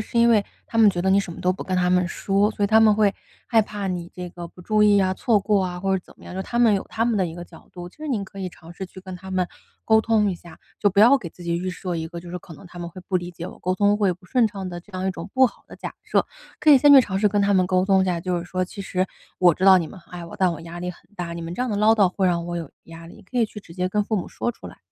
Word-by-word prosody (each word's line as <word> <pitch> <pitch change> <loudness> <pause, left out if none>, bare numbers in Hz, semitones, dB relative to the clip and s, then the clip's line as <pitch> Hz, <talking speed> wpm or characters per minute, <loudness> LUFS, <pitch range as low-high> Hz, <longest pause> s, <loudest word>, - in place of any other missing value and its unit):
是 235 - -2
因 235 - +5
为 215 -4 +4 0.2
他 230 - -6
们 220 -2 +7
觉 175 - -3
得 190 - 0
你 200 +1 +5
什 175 -4 -6
么 - - -10
都 180 - +2
不 185 - -7
跟 185 -1 -2
他 180 0 +2
们 180 0 +3
说， 200 +3 +1
所 205 -1 -1
以 - - +3
他 220 +2 +5
们 220 -1 +6
会 205 -2 +2 0.3
害 225 -2 +4
怕 205 -1 -5
你 175 -2 -4
这 180 -1 -7
个 170 -1 -8
不 180 - -16
注 215 +3 +2
意 205 -1 +5
啊、 185 -1 +1
错 220 +2 +2
过 200 -1 +1
啊， 180 -1 -4
或 190 +1 0
者 180 - -6
怎 - - -17
么 - - -16
样， 185 - -6
他 235 +4 -3
们 225 -4 +5
有 195 - -2
他 225 - 0
们 235 -2 +1
的 190 -3 +1
一 165 - -7
个 175 0 -8
角 - - -17
度。 175 0 -8
就 180 - -23
是 305 -1 -6
您 215 -7 -1
可 195 0 -11
以 185 - -3
尝 170 -1 -14
试 190 - -6
去 185 - -13
跟 185 0 -8
他 190 +1 -10
们 185 -1 0 0.4
沟 220 0 +5
通 220 -2 +2
一 - - -3
下， 170 0 -14 0.2
就 205 - +3
不 200 - -2
要 240 +6 +7
给 200 -11 -6
自 180 - -14
己 170 0 0
预 185 +1 -3
设 180 0 -5
一 160 -1 -3
个 170 0 -8
就 175 - -12
是 180 - -4
可 170 - -13
能 155 - -14
他 175 - -16
们 170 - -5
会 185 - -10
不 185 - +2
理 175 0 -4
解 170 0 -8
我、 - - -10
沟 185 - 0
通 205 +1 +3
会 200 -3 +2
不 180 +1 -15
顺 240 +5 +2
畅 195 -3 -6
的 175 -1 -7
这 205 - -22
样 185 +1 -3
一 - - +1
种 175 +3 -8
不 260 0 +5
好 - - -11
的 - - -11
假 - - -7
设。 - - +1 0.3
可 310 - +5
以 285 - +10
先 290 +2 +6
去 275 - +10
尝 205 -6 -3
试 210 - +3
跟 205 0 +1
他 200 0 +2
们 185 -1 +4
沟 185 0 +2
通 195 -1 +4
一 - - +1
下， 175 -2 -1
就 180 0 -1
是 170 - -6
说： 185 +1 -2
“其 200 +2 -8
实 185 0 -1 0.3
我 175 -3 +5
知 185 - -2
道 190 -1 +8
你 165 - -2
们 190 - -12
爱 175 -1 -7
我， - - -10
但 185 -2 +2
我 165 - -7
压 170 +1 -8
力 180 - -3
很 180 - -14 0.2
大， 175 -2 -4
你 170 - -6
们 165 +1 -6
这 250 - -2
样 250 - -2
的 205 - -1
唠 215 +2 +5
叨 200 -4 +4
会 190 +1 0
让 170 -2 +1
我 175 0 -4
有 165 -4 -5 0.2
压 165 0 -11
力。” 210 +5 -14
可 250 - -2
以 230 - +4
去 210 - -10
直 165 - -15
接 180 0 -1
跟 210 +2 +1
父 215 - -1
母 185 - -3
说 - - -2
出 - - -12
来。 - - -12
190 Hz, 375 characters per minute, -23 LUFS, 175-210 Hz, 0.4 s, 以